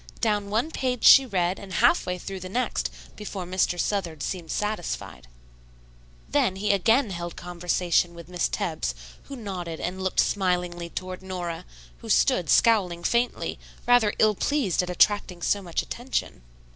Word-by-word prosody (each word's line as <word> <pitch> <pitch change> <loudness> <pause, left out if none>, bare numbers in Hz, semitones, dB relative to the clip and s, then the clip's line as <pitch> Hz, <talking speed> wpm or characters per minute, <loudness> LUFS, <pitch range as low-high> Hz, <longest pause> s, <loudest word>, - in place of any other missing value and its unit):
Down 210 -3 0
one 230 +10 0
page 255 -5 -2
she 270 -1 +9
read 185 -3 0
and 195 -2 -9
half 240 - +3
way 180 0 -1
through 190 +2 -6
the 185 0 -7
next 250 +6 -1 0.3
before 200 -3 -6
Mr. 180 0 0
Southard 170 -8 -2
seemed 175 -4 -4
satisfied. 210 - -3 1.0
Then 190 - +1
he 205 +2 0
again 225 +4 +3
held 175 -1 -5
conversation 175 0 0
with 170 -2 -11
Miss 180 -1 -1
Tebbs, 60 -1 -2 0.3
who 275 - -8
nodded 180 -8 -5
and 185 +2 -4
looked 190 - -1
smilingly 180 -3 0
toward 185 +1 -6
Nora, 180 -3 -5 0.3
who - - -10
stood - - +3
scowling 185 -7 +3
faintly, 240 +6 0 0.3
rather 245 -4 +5
ill 215 -1 +4
pleased 220 - 0
at 180 - -5
attracting 180 -1 +2
so 205 - +1
much 175 -3 -2
attention. 245 - -4
185 Hz, 155 wpm, -26 LUFS, 175-210 Hz, 1.0 s, she